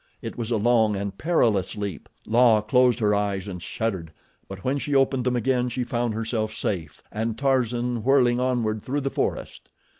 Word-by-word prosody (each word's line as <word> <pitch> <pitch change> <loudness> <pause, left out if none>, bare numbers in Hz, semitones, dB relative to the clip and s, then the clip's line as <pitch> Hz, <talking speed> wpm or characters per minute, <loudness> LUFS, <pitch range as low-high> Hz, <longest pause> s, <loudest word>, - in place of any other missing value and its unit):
It - - -7
was 115 -2 -4
a 115 - +1
long 110 -1 +3
and 100 0 -4
perilous 110 - +1
leap. 100 -2 -5 0.2
La 115 -2 +4
closed 125 +3 +3
her 105 -3 +2
eyes 100 -2 -1
and 90 -3 -6
shuddered; 95 -8 -3 0.4
but 95 -1 -9
when 135 +2 0
she 145 0 -2
opened 135 -2 +2
them 125 -1 +1
again 125 0 +1
she 125 +1 -2
found 120 -2 -2
herself 110 -1 -2
safe 80 -7 -4
and 110 +1 -3
Tarzan 125 -3 0
whirling 125 -2 +3
onward 120 -4 0
through 145 +6 -2
the 135 0 -2
forest. - - -3
115 Hz, 180 wpm, -24 LUFS, 105-125 Hz, 0.4 s, La